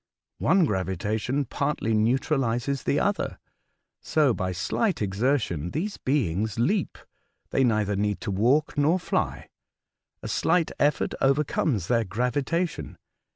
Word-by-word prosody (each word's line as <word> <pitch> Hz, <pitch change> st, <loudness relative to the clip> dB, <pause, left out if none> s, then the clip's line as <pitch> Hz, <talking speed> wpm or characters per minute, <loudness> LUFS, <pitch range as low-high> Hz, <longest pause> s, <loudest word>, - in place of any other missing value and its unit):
One 175 Hz, +2 st, +4 dB
gravitation 105 Hz, -, -1 dB
partly 140 Hz, -4 st, -1 dB
neutralises 125 Hz, +3 st, +1 dB
the 145 Hz, -, +2 dB
other. 205 Hz, +4 st, -1 dB, 0.6 s
So 150 Hz, -6 st, +2 dB
by 95 Hz, -2 st, -2 dB
slight 180 Hz, -, -1 dB
exertion 100 Hz, -, 0 dB
these 190 Hz, -, -3 dB
beings 110 Hz, -, -1 dB
leap, 185 Hz, -, 0 dB, 0.3 s
— -, -, -47 dB
they 135 Hz, -, +2 dB
neither 105 Hz, -4 st, +1 dB
need 105 Hz, 0 st, -1 dB
to 105 Hz, -, -3 dB
walk 125 Hz, +11 st, +2 dB
nor 155 Hz, +5 st, +3 dB
fly; -, -, -2 dB, 0.8 s
a -, -, -4 dB
slight 165 Hz, 0 st, +1 dB
effort 145 Hz, 0 st, +1 dB
overcomes 135 Hz, -, +1 dB
their 115 Hz, -2 st, +2 dB
gravitation. 125 Hz, -, -2 dB
125 Hz, 120 wpm, -26 LUFS, 105-150 Hz, 0.8 s, One